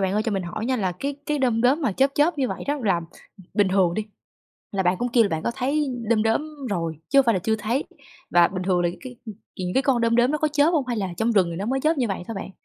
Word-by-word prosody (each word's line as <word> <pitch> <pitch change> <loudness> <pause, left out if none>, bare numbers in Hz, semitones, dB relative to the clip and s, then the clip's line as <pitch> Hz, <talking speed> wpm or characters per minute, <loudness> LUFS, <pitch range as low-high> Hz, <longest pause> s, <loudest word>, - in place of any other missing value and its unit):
bạn 190 0 0
ơi 215 - +1
cho 220 -1 -2
mình 195 -2 -1
hỏi 175 +6 -5
nha, 260 -1 +1
là 190 -5 -1
cái 280 0 -2
cái 295 -1 0
đom 240 -4 +1
đóm 265 +6 +3
mà 220 - +1
chớp 270 +6 +2
chớp 300 +1 +2
như 260 - +1
vậy - - -5
đó 290 +1 0
là 185 -4 +2 0.5
bình 205 -3 +3
thường 185 -3 +2
đi, 215 - -1 0.7
là 195 -1 0
bạn 180 +1 +2
cũng 245 - -1
kêu 240 - +6
là - - +1
bạn 160 0 -2
có 235 - -1
thấy 290 +4 0 0.2
đom 220 -2 +3
đóm 225 +6 +1 0.3
rồi, 165 -5 -2
chứ 275 - +4
hông 270 - +6
phải 230 - +4
là - - +1
chưa 220 +4 0
thấy, 230 +7 -1 0.5
và 175 -1 +5
bình 185 -1 -4
thường 180 -1 +1
là 175 - +2
cái 250 -2 -9 0.4
những 180 -1 -3
cái 265 - +3
con 255 -3 +2
đom 230 0 +2
đóm 240 +3 +4
nó 300 - 0
có 310 - +1
chớp 295 +2 +3
hông 295 -6 +1
hay 240 -2 -2
là 195 -3 -1
trong 230 +3 +1
rừng 190 -5 +3
thì 165 - -5
nó 200 +3 -3
mới 265 +2 0
chớp 310 0 +1
như 245 - +1
vậy 195 -2 -3
thôi 225 - -4
bạn? 195 - -6
225 Hz, 305 wpm, -24 LUFS, 190-270 Hz, 0.7 s, kêu